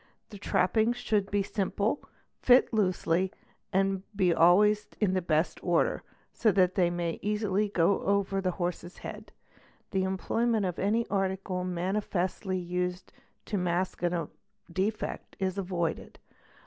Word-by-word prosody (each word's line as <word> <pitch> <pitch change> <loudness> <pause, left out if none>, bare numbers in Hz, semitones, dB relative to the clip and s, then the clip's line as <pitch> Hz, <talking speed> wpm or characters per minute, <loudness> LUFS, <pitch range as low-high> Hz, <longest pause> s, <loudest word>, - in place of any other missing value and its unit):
The 205 - -9
trappings 220 +5 +2
should 205 -4 0
be 205 -1 +1
simple, 200 +5 -1 0.4
fit 250 +1 +5
i - - 0
dosely, 185 -2 +1 0.4
and 195 0 +1
be 185 -4 +3
always 205 +6 +5
in 200 -4 +2
the 185 - +1
best 160 0 0
order, 175 -2 +1 0.3
so 220 - +3
that 185 -1 +3
they 180 -2 +3
may 175 -1 -2
easily 210 0 0
go 185 0 +2
over 195 0 +1
the 185 -1 0
jh - - -16
lorse's 175 0 -3
head. - - -8 0.6
The 190 - +1
employment 215 +3 0
of 180 -1 -3
any 220 +4 +1
article 190 -2 -1
manifestly 185 +1 -1
used 180 +1 -3 0.3
to 205 - -2
mask 180 +1 -1
a 175 -3 0 0.2
| 105 +10 -22
lefect 210 +3 -2
is 190 0 -1
avoided. 175 -4 -3
190 Hz, 145 wpm, -29 LUFS, 180-205 Hz, 0.6 s, fit